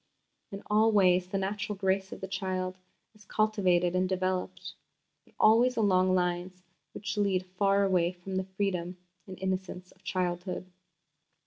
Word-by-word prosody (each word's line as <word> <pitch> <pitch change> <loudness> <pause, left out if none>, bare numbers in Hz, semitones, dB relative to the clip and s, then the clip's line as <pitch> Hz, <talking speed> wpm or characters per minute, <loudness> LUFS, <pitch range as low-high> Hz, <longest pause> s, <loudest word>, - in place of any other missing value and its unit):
In 195 +1 -7
all 215 +2 +3
ways 185 -3 +4
the 195 - -2
natural 200 +2 -2
grace 190 0 0
of - - -8
the 190 - -4
child 185 -1 -3 0.3
is 215 -1 -19
cultivated 185 -5 +2
and 185 0 +1
developed, 185 0 -2 0.5
but - - -26
always 240 +4 +5
along 185 -3 +3
lines 180 0 -2 0.3
which 210 - -4
lead 195 -3 +1
far 195 +2 +2
away 180 -3 +2
from 185 +1 -6
the 190 - 0
freedom 185 -2 -2 0.3
and 185 -1 -8
innocence 185 -1 -4
of 190 - -25
childhood. 180 -1 -2
190 Hz, 145 wpm, -29 LUFS, 185-200 Hz, 0.5 s, always